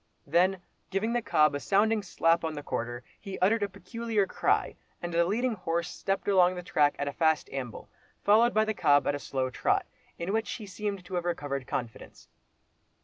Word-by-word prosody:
Then 180 +4 +2 0.3
giving 200 +5 -1
the 240 - +1
cob 150 -8 +3
a 145 - -2
sounding 210 +6 +2
slap 165 -3 +1
on 160 -1 -2
the 145 - -6
quarter, 120 -2 -4 0.2
he 195 -2 -7
uttered 210 +4 +3
a 205 - 0
peculiar 220 +1 -2
cry, - - 0 0.2
and 175 0 -5
the 170 0 +3
leading 235 +7 0
horse 170 -3 -2
stepped 195 0 -2
along 185 -2 +4
the 180 - -6
track 145 -4 +2
at 145 - -2
a 140 - -3
fast 160 -2 +2
amble, 130 -4 -6 0.4
followed 225 +4 +5
by 215 -1 +3
the 220 - -1
cob 145 -7 +3
at - - +1
a 145 - -3
slow 130 -2 -2
trot, - - +1 0.3
in 175 +4 -3
which 220 -1 -1
he 215 - -7
seemed 200 -1 -4
to 190 - -10
have 175 -1 -1
recovered 145 -7 -3
confidence. 120 -3 -6
180 Hz, 200 wpm, -29 LUFS, 150-205 Hz, 0.4 s, followed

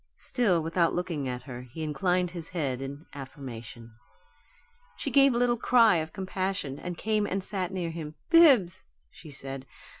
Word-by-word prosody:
Still 190 -10 +1
without 165 +1 +1
looking 170 -6 -2
at 125 0 -5
her, 125 -2 -7
he 160 +5 -5
inclined 180 +3 0
his 170 -3 -6
head 140 -8 -2
in 140 +3 -7
affirmation. 125 -4 -9 1.0
She - - -4
gave 275 -1 +6
a 240 - 0
little 240 0 +2
cry 230 -5 +5
of 160 0 -3
compassion, 185 -7 -3
and 180 -1 -5
came 215 0 0
and 195 0 -2
sat 185 -2 -3
near 175 -3 -3
him. 155 -2 -7 0.2
"Bibbs," 255 - +6 0.3
she 160 - -13
said. 135 -1 -5
170 Hz, 160 wpm, -28 LUFS, 140-190 Hz, 1.0 s, gave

